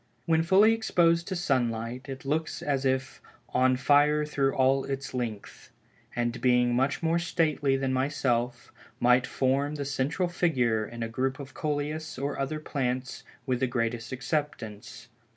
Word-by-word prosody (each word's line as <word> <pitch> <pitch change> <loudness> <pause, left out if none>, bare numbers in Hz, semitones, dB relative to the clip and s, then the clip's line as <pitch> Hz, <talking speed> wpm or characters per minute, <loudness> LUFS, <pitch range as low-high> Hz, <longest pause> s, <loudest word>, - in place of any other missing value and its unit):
When 160 -1 +3
fully 195 +6 +5
exposed 170 -6 +2
to 190 - -3
sunlight, 125 -4 -1
it 135 0 -7
looks 155 +3 -2
as 140 -2 0
if 130 +1 -1 0.3
"on 130 0 +3
fire 150 +3 +4
through 140 -2 0
all 135 +1 +3
its 135 -1 -5
length," 115 -5 -5 0.5
and 120 0 -1
being 125 -1 +3
much 135 +5 0
more 165 +1 +2
stately 155 -5 +1
than 135 -1 -1
myself, 130 -3 -1 0.3
might 125 +1 +4
form 140 +3 0
the 145 -1 -4
central 140 +6 -1
figure 125 -11 +1
in 115 0 -6
a - - -2
group 130 +4 -2
of 140 -1 -9
Coleus 150 +1 -3
or 140 +2 -3
other 135 +3 -2
plants 130 -4 -3 0.2
with 130 -3 0
the 130 - +1
greatest 115 -1 -2
acceptance. 125 -5 -4
135 Hz, 150 wpm, -28 LUFS, 125-150 Hz, 0.5 s, fully